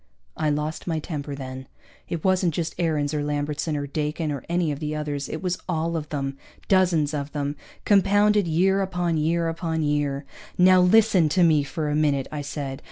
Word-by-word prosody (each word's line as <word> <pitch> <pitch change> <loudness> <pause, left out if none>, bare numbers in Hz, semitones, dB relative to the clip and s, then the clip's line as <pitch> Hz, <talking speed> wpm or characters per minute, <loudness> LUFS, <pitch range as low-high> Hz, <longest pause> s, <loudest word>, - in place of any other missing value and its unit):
I 155 -1 0
lost 150 +3 -2
my 165 -2 0
temper 145 -3 -5
then. 130 -1 -7 0.4
It 165 -2 -3
wasn't 185 -4 +2
just 165 -2 -2
Aarons, 155 -4 0
or 150 -1 -1
Lambertson, 150 +1 -2
or 145 - -3
Dakin, 150 +2 -2
or 140 -4 -4
any 170 -2 +1
of 145 - -4
the 155 -1 -3
others. 145 -2 -3
It 160 - -5
was 180 0 -1
all 165 0 -1
of 150 -2 -4
them, 135 -2 -3 0.3
dozens 175 -6 +3
of 145 -1 -4
them, 145 -1 -2 0.3
compounded 205 0 +4
year 190 +5 +2
upon 180 -3 -1
year 165 +2 +1
upon 165 -1 -2
year. 145 -1 -1 0.3
"Now 185 0 +6
listen 185 -3 +5
to 180 +4 +3
me 155 -3 +4
for 150 +2 -3
a 150 - 0
minute," 145 -3 +1
I 150 -1 -4
said. 140 -2 -5
155 Hz, 190 wpm, -24 LUFS, 145-175 Hz, 0.4 s, Now